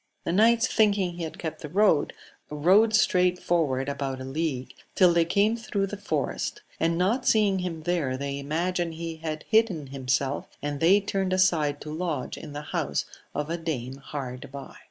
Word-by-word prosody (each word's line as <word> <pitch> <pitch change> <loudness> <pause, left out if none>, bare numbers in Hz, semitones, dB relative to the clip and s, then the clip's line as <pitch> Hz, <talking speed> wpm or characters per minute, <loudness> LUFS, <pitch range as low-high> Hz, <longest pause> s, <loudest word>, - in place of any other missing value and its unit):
The - - -1
knights 225 +5 +4
thinking 200 -6 +2
he 170 0 -6
had 160 - -8
kept 160 -2 -5
the 150 - -6
road, 190 -5 +3 0.4
rode 190 +9 +4
straight 180 -3 +3
forward 145 -7 0
about 135 -2 -3
a - - -6
league 135 -2 -3 0.2
till 180 -2 +6
they 170 -1 +3
came 205 +6 +2
through 215 -4 -2
the 195 - -5
forest, 205 0 -3 0.2
and 165 0 +1
not 225 +9 +1
seeing 205 -3 +3
him 170 -3 -4
there 155 -7 0
they 140 0 -3
imagined 170 +3 -1
he 165 0 -5
had 155 -1 -5
hidden 220 -9 +2
himself, 135 +1 -1
and 145 -1 -3
they 190 +6 +5
turned 195 -2 -1
aside 160 -6 +2
to 150 - -6
lodge 160 -5 -3
in 150 - -9
the 145 +1 -5
house - - -1 0.3
of 150 +2 -2
a 170 - -1
dame 135 -6 -4
hard 135 -2 -7
by. 140 -1 -9
165 Hz, 180 wpm, -26 LUFS, 145-190 Hz, 0.4 s, till